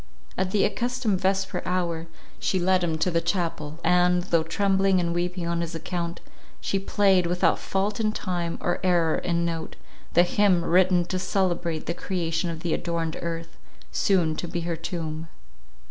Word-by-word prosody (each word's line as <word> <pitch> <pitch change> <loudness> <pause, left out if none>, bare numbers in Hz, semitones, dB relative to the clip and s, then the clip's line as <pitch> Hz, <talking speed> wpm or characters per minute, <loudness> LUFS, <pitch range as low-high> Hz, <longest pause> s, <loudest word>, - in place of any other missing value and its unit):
At 190 0 0
the 200 +1 +2
accustomed 230 -2 -1
vesper 190 0 0
hour, 170 -2 -1 0.3
she 190 - 0
led 185 0 +2
him 165 -2 0
to 180 +3 +1
the 165 0 +2
chapel; 165 -3 -2
and, 180 +1 +3
though 170 -2 +2
trembling 190 +3 +2
and 170 -1 0
weeping 175 0 -2
on 170 0 0
his 170 0 -4
account, 170 +1 -4 0.4
she 195 - -1
played, 195 -2 +3
without 180 +1 +2
fault 200 +3 -1
in 215 -1 +2
time, 175 -5 -3
or 175 - 0
error 170 -3 +3
in 170 -1 0
note, 165 -1 -3 0.4
the 175 - +7
hymn 180 -1 +3
written 180 0 +4
to 185 +1 -2
celebrate 175 -4 0
the 170 - -1
creation 175 -1 -2
of 165 -1 -5
the 170 -1 -1
adorned 165 -2 -2
earth, 165 -1 -5 0.3
soon 175 -6 +2
to 175 - -4
be 170 0 -3
her 170 0 -2
tomb. 160 -1 -4
175 Hz, 170 wpm, -26 LUFS, 170-185 Hz, 0.4 s, the